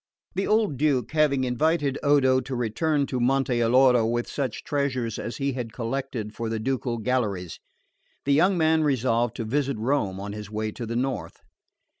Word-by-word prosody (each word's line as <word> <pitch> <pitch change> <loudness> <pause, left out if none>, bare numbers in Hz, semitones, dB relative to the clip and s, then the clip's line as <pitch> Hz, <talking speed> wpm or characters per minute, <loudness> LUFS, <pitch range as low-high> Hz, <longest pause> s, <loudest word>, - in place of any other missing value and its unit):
The 195 +2 -1
old 210 - +2
Duke 130 -5 +1
having 150 -4 +2
invited 140 +3 +1
Odo 135 -3 +4
to 130 +1 -5
return 140 +6 0
to 130 -2 -3
Monte 130 0 +1
Alloro 125 0 +5
with 120 +1 -1
such 135 -5 -3
treasures 130 -6 -1
as 120 - -5
he 140 -1 0
had 120 -3 -5
collected 120 -3 -4
for 115 -1 -4
the 110 0 -2
ducal 125 0 -2
galleries, 105 -7 -2 0.7
the 140 - +3
young 180 +6 +4
man 160 -1 +3
resolved 120 -4 +1
to 115 - -4
visit 140 +2 -1
Rome 110 -5 0
on 100 +1 -5
his 105 -1 -7
way 110 0 -3
to 115 +1 -6
the 115 - -3
North. 120 -10 -3
130 Hz, 175 wpm, -25 LUFS, 115-140 Hz, 0.7 s, Alloro